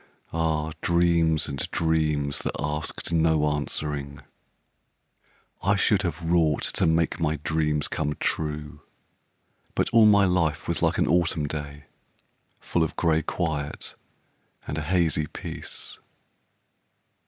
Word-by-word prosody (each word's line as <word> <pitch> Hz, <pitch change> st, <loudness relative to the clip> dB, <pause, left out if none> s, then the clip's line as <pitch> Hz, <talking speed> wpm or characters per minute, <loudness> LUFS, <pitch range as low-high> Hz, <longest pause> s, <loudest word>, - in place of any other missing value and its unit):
Ah, 80 Hz, -1 st, 0 dB
dreams 85 Hz, -2 st, +2 dB
and 70 Hz, -, -5 dB
dreams 75 Hz, -3 st, 0 dB
that -, -, -3 dB
asked 75 Hz, +2 st, -3 dB
no 80 Hz, -2 st, +3 dB
answering! 75 Hz, -1 st, -3 dB, 1.4 s
I 100 Hz, +3 st, +3 dB
should 100 Hz, 0 st, +3 dB
have 85 Hz, -3 st, -3 dB
wrought 80 Hz, -3 st, +2 dB
to -, -, +2 dB
make 80 Hz, +1 st, +1 dB
my 80 Hz, -2 st, +1 dB
dreams 75 Hz, -2 st, 0 dB
come 75 Hz, -1 st, -2 dB
true, 75 Hz, -1 st, -2 dB, 0.9 s
But -, -, +1 dB
all 115 Hz, -2 st, +7 dB
my 100 Hz, -1 st, +6 dB
life 85 Hz, -5 st, +1 dB
was -, -, -1 dB
like -, -, +2 dB
an -, -, +3 dB
autumn 80 Hz, -1 st, +2 dB
day, 75 Hz, -1 st, -6 dB, 0.8 s
Full 85 Hz, -, -1 dB
of 80 Hz, -, 0 dB
gray 80 Hz, -2 st, +2 dB
quiet 75 Hz, -4 st, -3 dB, 0.7 s
and 75 Hz, -, -3 dB
a -, -, -2 dB
hazy 80 Hz, -2 st, +1 dB
peace. -, -, -7 dB
80 Hz, 120 wpm, -26 LUFS, 75-85 Hz, 1.4 s, all